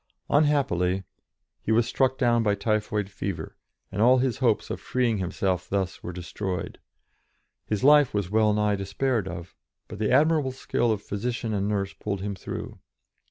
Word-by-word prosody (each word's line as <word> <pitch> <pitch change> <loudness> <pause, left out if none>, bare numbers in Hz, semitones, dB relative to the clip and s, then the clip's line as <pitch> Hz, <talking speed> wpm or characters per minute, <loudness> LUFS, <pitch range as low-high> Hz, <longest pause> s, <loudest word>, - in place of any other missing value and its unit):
Unhappily 105 - +2 0.6
he - - -2
was 115 +1 +4
struck 130 +1 +1
down 120 -2 +3
by 105 -2 +2
typhoid 105 0 -1
fever, 100 -2 -5 0.4
and 100 - -2
all 125 +3 +6
his 125 -1 0
hopes 115 -5 +1
of - - -4
freeing 120 -4 0
himself 90 0 -1
thus 95 -2 -2
were 90 - -5
destroyed. 90 +1 -5 0.9
His 105 +1 -1
life 145 -1 +6
was 100 -3 -2
well 110 0 +4
nigh 105 -1 +1
despaired 100 +3 -1
of, 85 0 -7 0.3
but - - -9
the 110 +1 +1
admirable 150 0 +3
skill 120 -2 0
of 105 -2 -2
physician 115 +2 -3
and 100 -1 0
nurse 100 -2 -1
pulled 100 -2 -4
him 100 +1 -3
through. 95 - -7
105 Hz, 160 wpm, -26 LUFS, 95-125 Hz, 0.9 s, all